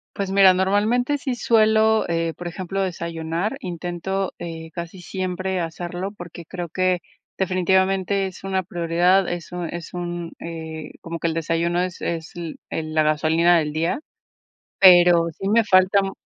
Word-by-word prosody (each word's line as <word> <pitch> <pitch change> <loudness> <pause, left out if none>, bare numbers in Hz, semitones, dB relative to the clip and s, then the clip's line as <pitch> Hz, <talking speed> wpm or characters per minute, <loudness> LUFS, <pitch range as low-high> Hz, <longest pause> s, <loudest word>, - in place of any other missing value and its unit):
Pues 195 -1 -2
mira, 195 -1 +6
normalmente 215 +9 +1
sí 260 -3 -3
suelo, 220 -1 +3
eh, 165 -1 0
por 175 -1 -5
ejemplo, 190 +2 -4
desayunar, 170 +3 -3
intento, 180 +2 -3
eh, 165 -1 -7
casi 170 +2 -7
siempre 185 0 -3
hacerlo, 175 +3 -4
porque 175 -4 -10
creo 175 +1 -6
que 185 +1 +1 0.4
definitivamente 190 +1 +1
es 190 0 -11
una 190 -1 -1
prioridad, 175 +2 +2
es 175 0 -6
un 175 -2 -4
es 170 0 -7
un, 175 -1 -5
eh, 160 -2 -7
como 165 0 -6
que 170 - 0
el 165 - -1
desayuno 165 +2 0
es 180 -1 -4
es 165 -1 -3
el 170 -2 -6 0.4
la 155 - +3
gasolina 160 +3 +3
del 150 -2 0
día, 165 - -1 0.8
pero 175 -2 +7
sí 195 - -3
me 225 +3 +4
falta 190 0 +4
mm, 195 - -3
175 Hz, 155 wpm, -22 LUFS, 170-195 Hz, 0.8 s, pero